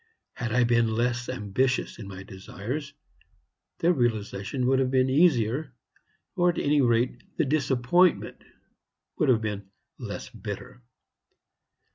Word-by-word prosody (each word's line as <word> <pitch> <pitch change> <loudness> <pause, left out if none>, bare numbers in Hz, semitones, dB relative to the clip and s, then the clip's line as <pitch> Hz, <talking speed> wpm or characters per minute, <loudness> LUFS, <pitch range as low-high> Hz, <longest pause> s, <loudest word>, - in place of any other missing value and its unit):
Had 120 -3 -4
I 125 +1 +3
been 120 -1 +3
less 120 +2 -1
ambitious 125 +3 -1
in 105 - -7
my 95 -1 -8
desires, 120 +10 -6 0.8
their 175 +2 +3
realization 115 - -1
would 130 +1 +3
have 130 -1 +1
been 130 0 +2
easier, 135 -3 +2 0.6
or, 175 0 +3
at 175 - -1
any 145 0 +2
rate, 120 0 +1 0.2
the - - +2
disappointment 140 +5 +2 0.8
would - - +3
have 115 -3 +4
been 105 -2 -4 0.3
less - - -6
bitter. 125 - -8
125 Hz, 125 wpm, -27 LUFS, 110-135 Hz, 0.8 s, have